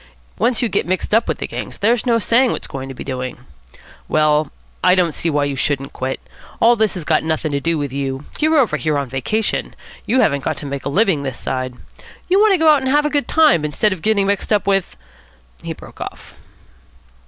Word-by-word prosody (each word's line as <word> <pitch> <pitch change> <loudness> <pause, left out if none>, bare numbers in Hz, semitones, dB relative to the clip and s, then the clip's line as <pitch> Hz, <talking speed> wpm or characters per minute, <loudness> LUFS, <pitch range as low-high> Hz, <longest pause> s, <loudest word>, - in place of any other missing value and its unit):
Once 235 +3 +1
you - - +2
get 200 - -1
mixed 185 +3 -2
up 225 +1 +3
with - - -1
the - - -4
gangs - - -6
there's 230 +4 +1
no 235 -1 +4
saying 235 +3 +3
what's - - -4
going 135 0 -6
to 135 - -7
be - - -7
doing. 130 -2 -4 0.7
Well, 155 -1 +2 0.3
I 180 0 +5
don't 175 -3 +2
see 165 - -1
why 145 -2 +1
you 140 -1 -2
shouldn't 135 0 -2
quit. 130 +1 -3 0.4
All 235 +1 +5
this 220 -3 +1
has 180 - -4
got 155 0 +2
nothing 160 -1 -1
to 140 - 0
do 165 +3 0
with 145 -3 -3
you. 135 0 -3
You're 315 +1 +3
over 265 -6 +3
here 155 -2 0
on 140 - 0
a 125 - -16
vacation. 205 - -1 0.3
You 255 +2 +3
haven't 140 -2 +1
got - - -2
to - - -5
make 140 -1 -5
a - - -1
living 190 -2 +2
this 135 -3 -4
side. 130 -1 -3 0.5
You 375 +2 +3
want 430 0 +5
to - - +4
go 320 - +1
about 300 -3 +6
and 265 - -1
have 295 +2 +3
a 300 - 0
good 290 -1 0
time, 305 - +4
instead 150 +8 +1
of 180 - -9
getting 210 -1 +2
mixed 200 +1 -1
up 210 -2 +2
with 195 - 0 0.3
" 60 -1 -32
He - - -5
broke - - -14
off. - - -8
170 Hz, 235 wpm, -19 LUFS, 140-230 Hz, 0.7 s, about